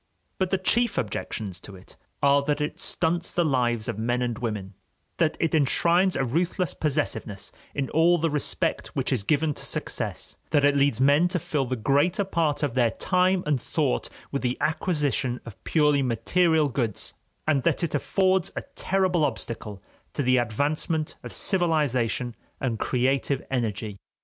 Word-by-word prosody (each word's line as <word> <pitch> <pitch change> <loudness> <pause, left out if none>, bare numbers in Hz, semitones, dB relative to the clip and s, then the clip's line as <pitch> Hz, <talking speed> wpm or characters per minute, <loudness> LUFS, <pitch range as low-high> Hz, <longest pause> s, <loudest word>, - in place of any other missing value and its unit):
But 190 -1 +1
the 190 - +2
chief 235 +6 +1
objections 100 -3 -3
to 100 +1 -11
it 90 - -14 0.3
are 140 0 +5
that 145 0 0
it 150 0 -3
stunts 170 +1 0
the 175 - +1
lives 120 -6 +1
of 105 - -3
men 120 +2 0
and 120 -1 -1
women, 105 -5 -4 0.4
that 160 -2 +1
it 165 - 0
enshrines 170 +5 +3
a 135 - +1
ruthless 175 - 0
possessiveness 145 -9 -2 0.2
in 140 -2 -1
all 170 +2 +4
the 165 -1 0
respect 150 -2 0
which - - 0
is 125 - +1
given 150 +7 +1
to - - -10
success, - - -3
that 145 -2 +3
it 145 0 +4
leads 140 -4 +3
men 145 +6 +5
to 180 +1 -1
fill 150 -4 -1
the 130 +1 -2
greater 145 - +2
part 165 -6 0
of 140 -5 0
their 120 -2 +3
time 185 +6 +1
and 145 -4 +1
thought - - -1 0.2
with 140 - -2
the 125 0 -1
acquisition 150 -6 0
of 115 - -11
purely 150 -3 +3
material 155 +6 +2
goods, 120 -7 -2 0.3
and 145 -3 +3
that 130 - +1
it 165 - -1
affords 185 +4 +1
a - - -3
terrible 185 -4 +1
obstacle 115 -7 -3 0.3
to 145 - -1
the 130 0 +4
advancement 145 +7 -1
of - - -8
civilization 130 - +1 0.2
and 120 -5 -2
creative 135 +2 0
energy. 110 -5 -2
145 Hz, 165 wpm, -26 LUFS, 120-165 Hz, 0.4 s, are